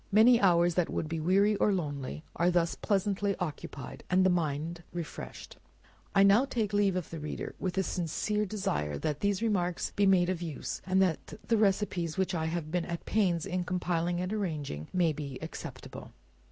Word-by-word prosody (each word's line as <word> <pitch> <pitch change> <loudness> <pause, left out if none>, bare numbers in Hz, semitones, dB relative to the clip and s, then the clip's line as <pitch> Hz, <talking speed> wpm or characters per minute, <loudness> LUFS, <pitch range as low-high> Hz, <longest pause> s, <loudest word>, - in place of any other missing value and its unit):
Many 230 +4 +6
hours 175 -2 +4
that 175 0 +1
would 155 - -2
be 165 +1 -3
weary 195 +6 +3
or 210 - +3
lonely, 150 -5 -3
are 175 +1 +3
thus 175 -1 +2
pleasantly 200 0 0
occupied, 145 -6 -6
and 185 +1 +4
the 185 - +5
mind 165 0 -1
refreshed. 170 -3 -7 0.6
I 195 - +7
now 200 +6 +6
take 225 -6 -2
leave 200 -2 +3
of 180 -3 -3
the 165 - -5
reader, 150 0 -5
with 185 -1 -3
a 190 - +3
sincere 205 +5 -1
desire, 75 - -2
that 150 - -2
these 200 +1 0
remarks 180 -6 0
may 200 - +5 0.2
be 180 - 0
of 180 -2 -3
use, 160 -5 -5
and 190 +1 +4
that 180 -4 -2
the 230 - +3
receipts 195 -5 +1
which 190 -1 0
I 160 -2 -1
have 160 -1 -3
been 175 -1 0
at 170 -1 -4
some - - -28
pains 185 -6 +1
in 185 -2 -1
compiling 175 -1 -1
and 180 +3 -2
arranging, 150 - -3
may 170 -3 +2
be 140 -3 -6
acceptable. - - -8
180 Hz, 190 wpm, -30 LUFS, 165-195 Hz, 0.6 s, I